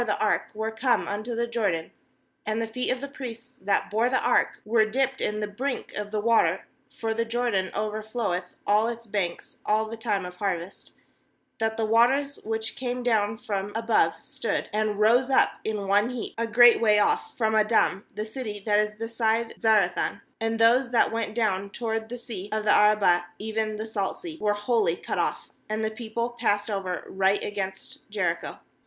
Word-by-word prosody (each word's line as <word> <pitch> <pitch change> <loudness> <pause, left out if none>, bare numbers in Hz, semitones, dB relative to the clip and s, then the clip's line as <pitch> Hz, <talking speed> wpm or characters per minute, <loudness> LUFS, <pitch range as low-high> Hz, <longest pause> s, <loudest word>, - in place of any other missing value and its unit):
15 240 - -1
JOSHUA 210 - +1
the - - +2
ark - - +2
were 220 +1 -2
come 220 -5 +1
unto 215 +5 -3
the 235 +1 0
Jordan 205 -9 -1 0.5
and 215 +1 -1
the 230 - 0
feet 240 +3 -3
of 255 0 -1
the 280 - -4
priests 255 -2 -9
that 200 +1 0
bore 225 +3 +2
the 260 - +2
ark - - +2
were 220 +1 +4
dipped 265 +4 0
in 210 0 -1
the 210 - -1
brink 250 +6 -4
of 210 0 -4
the 215 0 -2
water 230 +2 +2
— - - -41
for 225 -1 -1
the 230 +1 0
Jordan 230 -5 0
over 215 +1 -2
floweth 215 -5 -3
all 210 +2 +3
its 235 0 -5
banks 195 -5 -3
all 215 +1 +2
the 225 - -6
time 210 -4 -1
of 180 0 -9
harvest 185 -2 -4 0.3
— - - -45
16that 220 0 0
the 225 - +1
waters 260 +6 +3
which 225 0 -2
came 250 -1 -3
down 220 -3 +1
from 205 -4 -3
above 225 0 +2
stood, - - -3
and 210 -1 0
rose 240 +5 +4
up 265 - +5
in 210 -2 -3
one 205 +4 +3
heap, 250 -3 -5
a 230 0 -1
great 240 +1 +7
way 210 -2 +5
off 210 - +1
from 220 -2 +1
Adam, 215 -2 +3
the 215 - -3
city 220 -2 -6
that 210 -1 +3
is 210 0 0
beside 225 0 -1
Zarethan, 210 -6 +2 0.2
and 225 0 -1
those 235 +3 +4
that 240 - +3
went 225 -1 -3
down 200 -4 0
toward 225 +1 -3
the 245 - -5
sea 220 -5 -7
of 215 0 -1
the 210 - +5
Arabah, 205 -4 +4
even 220 0 -2
the 215 - -4
Salt 205 -3 -2
Sea, 330 -3 -8
were 210 -1 +2
wholly 210 -4 +1
cut - - -4
off; - - -2 0.2
and 215 +1 -1
the 220 - -1
people 235 +1 -3
passed 205 -2 +1
over 190 -3 -3
right 195 +1 +1
against 190 -1 -5
Jericho. 180 -5 -2
220 Hz, 200 wpm, -26 LUFS, 205-235 Hz, 0.5 s, great